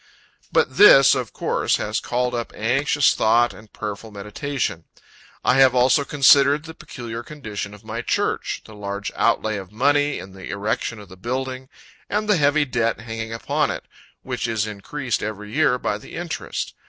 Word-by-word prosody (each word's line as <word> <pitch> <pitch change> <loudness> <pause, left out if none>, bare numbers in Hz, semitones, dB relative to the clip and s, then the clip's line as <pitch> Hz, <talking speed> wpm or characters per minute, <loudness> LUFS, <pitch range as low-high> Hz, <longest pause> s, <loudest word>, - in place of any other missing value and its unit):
But 130 - +1
this, 135 -9 +8
of 125 -5 -2
course, - - 0
has - - -2
called 125 0 -1
up 120 -1 -3
anxious 135 +5 +2
thought 120 +2 +3
and 105 0 -15
prayerful 105 +1 -6
meditation. 105 - -4 0.6
I 125 - +4
have 130 -1 +6
also 125 +3 +4
considered 140 +1 +5
the 160 - -8
peculiar 120 -6 -7
condition 110 -7 -7
of 105 - -17
my 110 +2 -4
church - - -1
the 110 - -13
large 100 -1 -5
outlay 110 -1 +1
of 95 -2 -8
money 145 +5 +2
in 95 - -9
the 95 -1 -10
erection 105 +3 -2
of 105 -1 -11
the 95 0 -14
building, 130 +4 -4 0.4
and 210 +1 -1
the 210 -3 +4
heavy 145 0 +3
debt 115 -3 -1
hanging 115 -1 -5
upon 115 - 0
it, - - -4 0.4
which - - -3
is 110 -2 0
increased 115 +5 -3
every 105 0 -6
year 145 -3 +3
by 105 -4 -2
the - - -12
interest. 170 -2 -4
120 Hz, 170 wpm, -22 LUFS, 105-140 Hz, 0.6 s, this